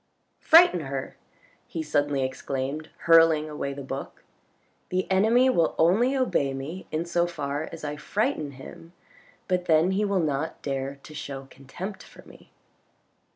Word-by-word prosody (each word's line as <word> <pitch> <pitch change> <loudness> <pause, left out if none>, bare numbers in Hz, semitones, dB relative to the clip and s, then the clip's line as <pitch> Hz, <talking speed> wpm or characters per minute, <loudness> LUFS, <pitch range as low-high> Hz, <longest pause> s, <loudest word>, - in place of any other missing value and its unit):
" - - -47
Frighten 330 - +6
her! 135 -3 -5 0.3
" - - -29 0.2
he 160 - -4
suddenly 145 -2 0
exclaimed, 135 +3 -4
hurling 165 -2 +5
away 150 -2 -4
the 140 0 -7
book. 135 +1 -7 0.3
" - - -41
The 185 +1 0
enemy 225 +7 +4
will 170 -11 +2
only 225 +11 +3
obey 140 - +1
me 150 +8 -7
in 155 +2 -1
so 170 0 +1
far 150 -2 -4
as 165 - -9
I 150 0 -4
frighten 155 - -2
him, 165 +5 -12 0.5
but 180 -1 0
then 160 +2 +4
he 195 +2 +1
will 200 -2 +1
not 155 -1 -2
dare 135 0 -3
to 155 - -12
show 135 -2 -6
contempt 175 +10 -8
for - - -15
me." - - -17
155 Hz, 160 wpm, -26 LUFS, 140-180 Hz, 0.5 s, Frighten